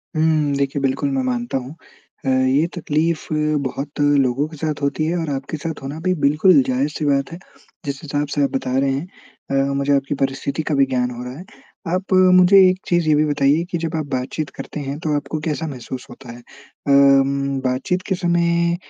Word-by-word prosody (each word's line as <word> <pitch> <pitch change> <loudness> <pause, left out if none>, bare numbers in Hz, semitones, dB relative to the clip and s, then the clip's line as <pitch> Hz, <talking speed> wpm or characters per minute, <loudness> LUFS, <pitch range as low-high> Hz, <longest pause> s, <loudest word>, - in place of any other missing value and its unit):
हुँ। 155 -2 +2
देखिए, 140 0 -1
बिल्कुल 135 - 0
मैं 265 -1 0
मानता 240 - -2
हूँ 130 +4 -7 0.5
अ, 135 - +1
ये 130 +4 +3
तकलीफ़ 160 0 -1 0.4
बहुत 140 +3 -5
लोगों 140 -1 +2
के 155 -1 -12
साथ 150 -1 -3
होती 140 +2 0
है 170 +2 0
और 165 -3 -3
आपके 140 +3 -5
साथ 160 0 -5
होना 145 +4 -5
भी 185 - +3
बिल्कुल 150 +1 +5
जायज़ 130 +3 0
सी 150 - -2
बात 140 +1 +1
है 170 - -7 0.5
जिस 140 -1 -4
हिसाब 145 0 -2
से 145 - +2
आप 140 - +2
बता 130 0 -1
रहे 135 0 +2
हैं 145 +7 -3 0.4
अ, 135 0 +1
मुझे 140 +1 +1
आपकी 140 +1 -1
परिस्थिति 135 +3 -4
का - - +2
भी 140 -1 +4
ज्ञान 125 -2 -1
हो 120 +1 -7
रहा 125 +3 -7
है। 185 - -10 0.4
आप 185 +3 -1 0.2
मुझे 185 +2 +6
एक 185 +1 -1
चीज़ 175 -2 +1
ये - - +5
भी 150 - +3
बताइए 145 +2 +2
कि 170 - 0
जब 165 0 -3
आप 155 -2 -2
बातचीत 135 +3 -3
करते 150 - -7
हैं 140 +1 -4
तो 155 -2 -1
आपको 155 +1 -3
कैसा 160 +1 -2
महसूस 130 -2 -7
होता 125 -3 -11
है? 120 - -10 0.5
अम, 140 0 +4
बातचीत 135 +9 -1
के 190 - 0
समय 170 -1 +1
145 Hz, 205 wpm, -20 LUFS, 135-160 Hz, 0.5 s, मुझे